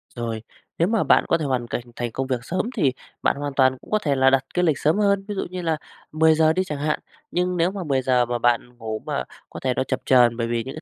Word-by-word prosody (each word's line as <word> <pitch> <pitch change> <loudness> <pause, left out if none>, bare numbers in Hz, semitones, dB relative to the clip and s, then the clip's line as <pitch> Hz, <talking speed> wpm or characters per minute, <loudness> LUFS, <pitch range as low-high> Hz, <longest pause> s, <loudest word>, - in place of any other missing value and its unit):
Rồi, 115 -2 -3 0.4
nếu 170 - +3
mà 220 0 +2
bạn - - +4
có 165 - +3
thể 160 - -3
hoàn 125 -3 -1
cảnh 120 - -3
thành 120 -1 -3
công 130 +3 -3
việc 130 -2 -1
sớm 180 +9 -1 0.2
thì 145 -9 +3 0.3
bạn - - +3
hoàn 145 0 -4
toàn 130 -1 +3
cũng - - -17
có 215 - +3
thể 145 -8 0
là 135 0 +5
đặt 135 0 +3
cái 180 - +1
lịch 155 -4 +2
sớm 155 +5 +2
hơn. 200 -1 +2
Ví 205 - -4
dụ 190 - -2
như 180 0 -5
là 165 -2 0 0.3
10:00 160 +1 +4
giờ 160 0 +4
đi 185 - +1
chẳng 150 -5 -5
hạn, 150 +1 0 0.3
nhưng 180 0 0
nếu 170 +2 +2
mà 195 -2 -5
10:00 135 -5 0 0.3
mà 120 0 -1
bạn 120 +1 0
ngủ 110 -2 -4
mà - - -2 0.3
có - - -8
thể 130 -1 +1
nó 130 - 0
chập 130 0 -2
chờn 120 -3 +5
bởi 115 -1 -1
vì 115 0 -1
những 135 - -7
cái 155 - -8
140 Hz, 285 wpm, -23 LUFS, 125-170 Hz, 0.4 s, là